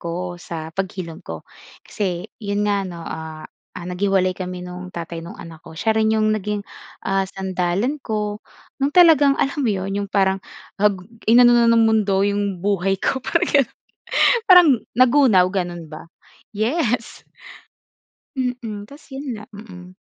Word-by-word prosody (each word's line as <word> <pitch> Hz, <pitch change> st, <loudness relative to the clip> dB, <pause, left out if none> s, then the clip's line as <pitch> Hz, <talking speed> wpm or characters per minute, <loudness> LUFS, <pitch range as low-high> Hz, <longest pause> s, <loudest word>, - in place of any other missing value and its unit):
ko 175 Hz, +1 st, -5 dB
sa 160 Hz, -2 st, -7 dB
paghilom 185 Hz, -3 st, -5 dB
ko. 80 Hz, -1 st, -8 dB, 0.4 s
Kasi 180 Hz, -4 st, -3 dB, 0.2 s
'yon 205 Hz, -1 st, -1 dB
nga 205 Hz, -1 st, +1 dB
'no, 175 Hz, -3 st, -7 dB
ah, 160 Hz, -1 st, -7 dB, 0.3 s
ah, 175 Hz, -, -7 dB
naghiwalay 185 Hz, +1 st, +1 dB
kami 180 Hz, -1 st, -6 dB
nung 180 Hz, 0 st, -8 dB
tatay 170 Hz, -2 st, -6 dB
nung 170 Hz, +5 st, -10 dB
anak 165 Hz, -2 st, -11 dB
ko. 160 Hz, -, -13 dB
Siya 220 Hz, +6 st, +1 dB
rin 220 Hz, 0 st, +2 dB
yung 215 Hz, 0 st, +2 dB
naging, 210 Hz, -1 st, -2 dB, 0.4 s
ah, 195 Hz, 0 st, 0 dB
sandalan 190 Hz, +8 st, -2 dB
ko, 210 Hz, -3 st, -3 dB, 0.4 s
no'ng 275 Hz, -, +2 dB
talagang, 300 Hz, -6 st, +6 dB
alam 275 Hz, +2 st, -1 dB
mo 255 Hz, -, +1 dB
'yon, 195 Hz, -2 st, -2 dB
yung 200 Hz, -, -4 dB
parang 195 Hz, -1 st, +1 dB, 0.4 s
ag 210 Hz, -1 st, +3 dB, 0.3 s
inano 240 Hz, +1 st, +7 dB
na 235 Hz, -1 st, +5 dB
ng 230 Hz, -1 st, +5 dB
mundo 205 Hz, -3 st, +2 dB
yung 200 Hz, -1 st, -1 dB
buhay 195 Hz, -1 st, +1 dB
ko 265 Hz, +7 st, -1 dB
parang -, -, +1 dB
gano'n. 275 Hz, -5 st, +2 dB, 0.7 s
Parang 360 Hz, -6 st, +8 dB, 0.3 s
nagunaw, 250 Hz, -8 st, +5 dB
gano'n 175 Hz, -3 st, -4 dB
ba. 155 Hz, 0 st, -9 dB, 0.5 s
Yes. 235 Hz, +2 st, -1 dB, 1.2 s
Mm. 235 Hz, -5 st, -3 dB
Tapos 285 Hz, +6 st, -16 dB
'yon 270 Hz, +2 st, -7 dB, 0.2 s
lang, 210 Hz, -, -16 dB
mm. 185 Hz, -4 st, -12 dB
200 Hz, 150 wpm, -21 LUFS, 180-225 Hz, 1.2 s, Parang